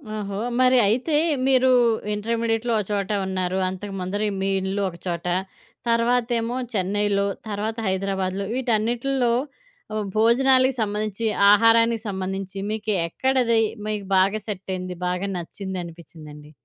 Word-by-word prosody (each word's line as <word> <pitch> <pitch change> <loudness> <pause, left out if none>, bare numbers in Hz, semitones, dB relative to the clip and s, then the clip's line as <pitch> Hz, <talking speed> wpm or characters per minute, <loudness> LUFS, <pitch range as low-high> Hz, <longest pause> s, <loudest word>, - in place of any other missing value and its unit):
ఓహో! 200 -2 -4 0.2
మరి 255 0 +5
అయితే 255 +9 +1 0.3
మీరు 260 -1 +4 0.4
ఇంటర్మీడియేట్‌లో 230 +2 -1
ఒక 210 - -1
చోట 200 -2 -1 0.2
ఉన్నారు. 185 -1 -2
అంతకుముందర 195 +1 -4 0.2
మీ 195 - 0
ఇల్లు 190 +2 -2
ఒక 170 - -12
చోట, 170 -1 -3 0.6
తర్వాతేమో 235 0 +1 0.2
'చెన్నైలో', 200 +1 +1 0.2
తర్వాత 215 +2 -3
'హైదరాబాద్‌లో' 190 0 -1
వీటన్నిటిల్లో 240 +1 0 0.6
ఆహ్, 215 -1 -1
భోజనాలకి 260 +3 +4
సంబంధించి, 215 +1 -2 0.3
ఆహారానికి 230 +1 +4
సంబంధించి 190 0 -4
మీకు 215 0 -2
ఎక్కడది, 245 +3 +1 0.3
మీకు 210 -2 -3
బాగా 195 +3 +3
సెటైంది? 185 -2 -4
బాగా 180 +2 -1
నచ్చిందనిపించిందండి? 170 -5 -8
205 Hz, 110 wpm, -23 LUFS, 190-230 Hz, 0.6 s, మరి